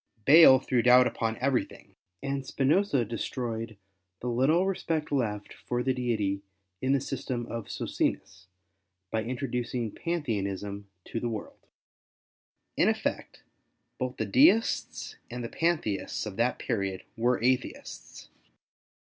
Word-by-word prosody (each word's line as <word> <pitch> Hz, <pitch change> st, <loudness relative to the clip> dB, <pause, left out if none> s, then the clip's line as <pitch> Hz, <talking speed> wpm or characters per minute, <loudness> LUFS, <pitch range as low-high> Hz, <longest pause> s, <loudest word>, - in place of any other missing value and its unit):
Bayle 150 Hz, -2 st, +9 dB
threw 130 Hz, -2 st, 0 dB
doubt 125 Hz, +1 st, +7 dB
upon 115 Hz, -2 st, -1 dB
everything, 130 Hz, -1 st, -2 dB, 0.3 s
and 135 Hz, 0 st, -2 dB
Spinosa 140 Hz, -, +2 dB
destroyed 115 Hz, -1 st, -4 dB, 0.4 s
the 125 Hz, -, -3 dB
little 140 Hz, +10 st, +3 dB
respect 170 Hz, -5 st, -2 dB
left 105 Hz, -7 st, -1 dB
for 120 Hz, 0 st, -3 dB
the 130 Hz, -, +1 dB
Deity 110 Hz, -6 st, -1 dB, 0.4 s
in 130 Hz, +1 st, +2 dB
the 140 Hz, -, +3 dB
system 130 Hz, -2 st, -4 dB
of 115 Hz, -3 st, -6 dB
Socinus, 90 Hz, -1 st, -3 dB, 0.6 s
by 110 Hz, -1 st, 0 dB
introducing 125 Hz, -2 st, -3 dB
Pantheism 100 Hz, -, -3 dB, 0.2 s
to 115 Hz, -, -4 dB
the 120 Hz, -, -2 dB
world. 275 Hz, -, -7 dB, 1.1 s
In -, -, +4 dB
effect, -, -, -3 dB, 0.6 s
both -, -, -3 dB
the -, -, -1 dB
Deists 265 Hz, -5 st, +3 dB
and 120 Hz, 0 st, -5 dB
the 115 Hz, -, -4 dB
Pantheists 155 Hz, -, -1 dB
of 105 Hz, -3 st, -6 dB
that 120 Hz, +3 st, +1 dB
period 95 Hz, -2 st, -2 dB
were 120 Hz, +2 st, +1 dB
Atheists. 130 Hz, +2 st, -2 dB
125 Hz, 125 wpm, -28 LUFS, 115-140 Hz, 1.1 s, Bayle